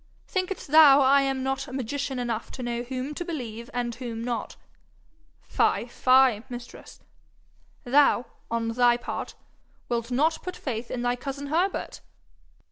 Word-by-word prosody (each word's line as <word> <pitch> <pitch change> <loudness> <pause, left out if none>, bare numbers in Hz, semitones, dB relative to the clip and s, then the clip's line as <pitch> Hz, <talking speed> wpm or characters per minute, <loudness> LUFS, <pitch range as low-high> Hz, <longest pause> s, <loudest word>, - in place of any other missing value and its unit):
think'st 370 -4 -3
thou 300 -3 +8
I 275 +1 +5
am 270 -1 -1
not 265 -1 -2
magician 265 +1 -3
enough 235 -2 -3
to 255 - -6
know 240 0 -2
whom 255 +3 -4
to 350 - -4
believe 240 -9 -6
and 240 -1 -2
whom 230 -1 -6
not? 240 -1 -3 0.9
Fye, - - +1
fye, 255 -2 +4
mistress! 245 -1 -10 0.8
Thou, 265 -1 +4 0.2
on 230 0 -1
thy 240 +1 +3
part, - - -6 0.5
wilt 235 -1 -2
not 310 +6 +1
put 365 0 -6
faith 235 -3 -5
in 245 - -3
thy 245 0 +1
cousin 275 +2 -6
Herbert!' 355 +6 -1
255 Hz, 140 wpm, -26 LUFS, 240-280 Hz, 0.9 s, thou